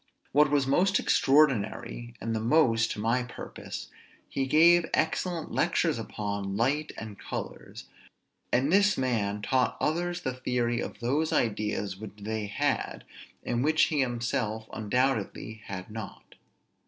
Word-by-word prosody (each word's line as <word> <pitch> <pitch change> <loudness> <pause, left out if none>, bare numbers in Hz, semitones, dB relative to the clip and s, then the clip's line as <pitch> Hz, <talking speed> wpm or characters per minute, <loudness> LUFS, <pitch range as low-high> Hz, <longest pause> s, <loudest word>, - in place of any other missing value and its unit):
What 150 +1 +5
was 145 -2 +2
the 135 - -1
most 190 +5 +3
extraordinary 125 -4 +2
and 115 0 -2
the - - 0
most 115 -2 +3
to - - -8
my 115 +4 +1
purpose, 125 0 -8 0.4
he 135 -1 -2
gave 170 +4 +5
excellent 165 +1 -1
lectures - - +1
upon 100 -1 -4
light 145 +7 +1
and 110 -2 -8
colors; - - -7 0.7
and 135 +6 +2
this 205 +1 +4
man 105 -6 -1
taught 130 -1 +1
others 175 +3 -1
the 130 - -2
theory 125 -2 -1
of - - -7
those 145 +7 +1
ideas 105 -3 0
which 105 -1 -8
they 110 0 -3
had, 100 - -1 0.4
and 120 +1 -1
which 155 +2 +4
he 150 - +1
himself 120 -3 -1
undoubtedly 110 -1 -1
had 95 +1 -7
not. 110 -2 -8
120 Hz, 140 wpm, -28 LUFS, 110-145 Hz, 0.7 s, What